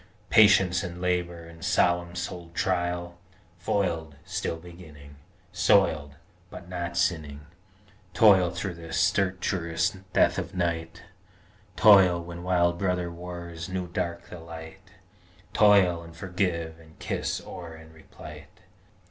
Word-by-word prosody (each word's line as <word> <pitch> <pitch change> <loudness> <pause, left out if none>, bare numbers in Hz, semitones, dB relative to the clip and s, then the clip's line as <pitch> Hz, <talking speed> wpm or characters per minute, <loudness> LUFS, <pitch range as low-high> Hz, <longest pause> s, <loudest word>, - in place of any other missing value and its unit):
Patience 95 -5 +5
and 90 -2 -6
Labor 90 -2 -2
and 80 0 -13
solemn 85 0 +1
souled 90 -1 -6
Trial, 85 -1 -2 0.4
Foiled, 85 -5 -1
still 95 -2 -3
beginning, 80 -4 -14 0.3
Soiled, 75 -2 +2 0.3
but 85 - -11
not 85 -1 -5
sinning. 75 -4 -1 0.7
Toil 95 -5 +6
through 95 +2 -4
the 85 -1 -10
stertorous 90 -2 0 0.2
death 85 0 +3
of 90 +1 -6
the - - -8
Night, 85 -2 -2 0.7
Toil 95 -5 +6
when 85 0 -8
wild 85 -1 +1
brother 90 -3 -1
wars 85 0 -8
new 95 -1 -3
dark 85 -1 -4
the 90 - -8
Light, 80 -1 -11 0.6
Toil, 100 -5 +5
and 85 0 -13
forgive, 85 -3 -2
and 80 -1 -18
kiss - - -3
o'er, 85 -3 -9
and 80 0 -15
replight. 80 - -12
85 Hz, 120 wpm, -27 LUFS, 85-90 Hz, 0.7 s, Toil